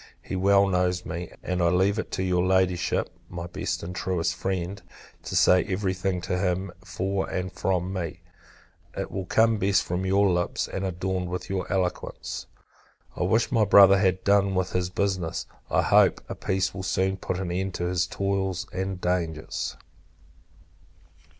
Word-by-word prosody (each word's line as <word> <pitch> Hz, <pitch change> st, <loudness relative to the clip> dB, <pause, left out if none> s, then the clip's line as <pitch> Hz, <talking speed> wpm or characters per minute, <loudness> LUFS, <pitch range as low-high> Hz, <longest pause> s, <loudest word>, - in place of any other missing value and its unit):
He -, -, -5 dB
well 100 Hz, +1 st, +4 dB
knows 90 Hz, -1 st, 0 dB
me; 85 Hz, +1 st, -5 dB
and 90 Hz, -1 st, -1 dB
I 85 Hz, -, +4 dB
leave 95 Hz, +4 st, +2 dB
it -, -, -4 dB
to 95 Hz, -, -1 dB
your 90 Hz, -1 st, +1 dB
Ladyship, 95 Hz, -1 st, +1 dB, 0.2 s
(my 85 Hz, -1 st, -5 dB
best 85 Hz, -, -3 dB
and 90 Hz, +2 st, -6 dB
truest 90 Hz, -2 st, -1 dB
friend) 95 Hz, 0 st, -3 dB, 0.4 s
to -, -, -5 dB
say 90 Hz, 0 st, +5 dB
every 95 Hz, -1 st, -1 dB
thing 90 Hz, -1 st, -2 dB
to 90 Hz, +1 st, -2 dB
him, 90 Hz, 0 st, -1 dB
for 95 Hz, +2 st, -2 dB
and 95 Hz, 0 st, -3 dB
from 90 Hz, +2 st, -1 dB
me: 85 Hz, -2 st, -4 dB, 0.8 s
it -, -, -3 dB
will 95 Hz, -2 st, -4 dB
come 110 Hz, +1 st, +3 dB
best 95 Hz, 0 st, +3 dB
from 90 Hz, +2 st, -2 dB
your 100 Hz, +1 st, +4 dB
lips, 90 Hz, -1 st, 0 dB
and 95 Hz, -, -4 dB
adorned 95 Hz, 0 st, -2 dB
with 90 Hz, +2 st, -5 dB
your 95 Hz, -1 st, -2 dB
eloquence. 90 Hz, -2 st, -3 dB, 0.7 s
I -, -, -5 dB
wish 110 Hz, +6 st, +2 dB
my 115 Hz, -3 st, +3 dB
Brother 100 Hz, -1 st, +7 dB
had 95 Hz, -1 st, +1 dB
done 100 Hz, -1 st, +3 dB
with 95 Hz, 0 st, 0 dB
this 90 Hz, -1 st, 0 dB
business. 95 Hz, -3 st, -1 dB, 0.2 s
I -, -, +2 dB
hope, -, -, +5 dB
a -, -, -4 dB
peace 95 Hz, 0 st, -1 dB
will 95 Hz, -, -5 dB
soon 95 Hz, +1 st, 0 dB
put 90 Hz, -, -3 dB
an 90 Hz, -2 st, -3 dB
end 95 Hz, +1 st, -2 dB
to -, -, -3 dB
his 90 Hz, 0 st, 0 dB
toils 95 Hz, -1 st, -1 dB
and 95 Hz, 0 st, -3 dB
dangers. 85 Hz, -4 st, -2 dB
95 Hz, 170 wpm, -26 LUFS, 90-95 Hz, 0.8 s, Brother